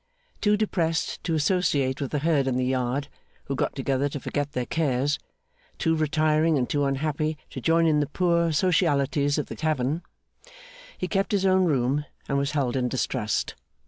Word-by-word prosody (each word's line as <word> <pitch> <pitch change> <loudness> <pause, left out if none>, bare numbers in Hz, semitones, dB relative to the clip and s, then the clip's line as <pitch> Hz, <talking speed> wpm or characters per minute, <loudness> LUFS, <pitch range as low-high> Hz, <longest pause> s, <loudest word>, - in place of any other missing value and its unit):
Too 210 -1 +3
depressed 170 -6 -1
to 165 -2 0
associate 145 -5 +1
with 140 - -2
the 150 - -1
herd 145 -2 +1
in 130 -1 0
the 130 - +1
yard, 130 +2 -1 0.4
who 135 - -3
got - - -1
together 135 +1 0
to 145 - -5
forget 145 +1 -3
their 125 -3 -1
cares; 145 -1 0 0.6
too 160 0 +1
retiring 155 0 +2
and 125 -2 0
too 145 -1 0
unhappy 155 +2 -1
to - - -6
join 165 0 +3
in 155 -2 +3
the 145 - 0
poor 170 -2 +2
socialities 145 -4 +2
of 150 - -1
the - - -8
tavern; 155 0 -1 1.0
he 185 - -2
kept 195 +1 0
his 195 -1 +2
own 185 -1 +4
room, 140 -1 +1 0.2
and 140 - +1
was 140 +1 -1
held 135 -5 0
in 125 -2 0
distrust. 110 -4 -1
150 Hz, 175 wpm, -26 LUFS, 135-165 Hz, 1.0 s, own